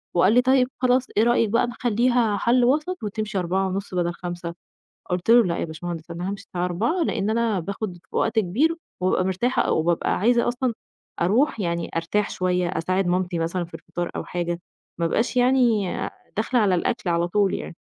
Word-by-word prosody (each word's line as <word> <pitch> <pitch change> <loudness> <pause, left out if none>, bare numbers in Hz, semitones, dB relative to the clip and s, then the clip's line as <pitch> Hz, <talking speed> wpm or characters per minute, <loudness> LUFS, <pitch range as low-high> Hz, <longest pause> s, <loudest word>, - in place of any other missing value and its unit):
وقال 185 +4 +5
لي 250 - +6
طيّب 260 0 +3
خلاص 255 0 +3
إيه 215 - +5
رأيِك 235 -2 +3
بقى 235 +3 +2
نخلّيها 240 -1 +1
حَلّ 240 +4 +3
وسط 305 +7 0
وتمشي 210 -1 -2
16:30 190 +2 -2
بدل 175 -1 0
17:00؟ 175 -1 -6 0.6
قُلت 180 +4 0
له 235 0 +7
لأ 170 -3 -1
يا - - -1
باشمهندس، 165 +1 -6
أنا 175 +2 -4
هامشي 200 0 -5
الساعة 180 -1 -3
16:00 220 - 0
لإن 215 -9 0
أنا 225 -3 +1
باخد 190 +1 -5
وقت 225 0 +1
كبير 240 - +2 0.3
وبابقى 185 0 +2
مرتاحة، 190 +7 0
وبابقى 165 +1 +1
عايزة 235 +3 +3
أصلًا 245 0 0 0.5
أرُوح 225 - +2
يعني 170 -2 -2
أرتاح 185 +5 0
شوية، 180 -1 0
أساعد 185 +2 0
مامتي 180 0 0
مثلًا 170 +2 -1
في 170 - -14
الفطار، 175 0 -5
أو - - -3
حاجة، 175 -1 -3 0.4
ما 170 - +1
أبقاش 230 +9 0
يعني 245 -6 +3 0.4
داخلة 235 +3 +1
على 200 -4 +3
الأكل 195 +2 -1
على 170 0 +1
طول 200 +1 +2
يعني، - - -6
195 Hz, 180 wpm, -24 LUFS, 175-240 Hz, 0.6 s, له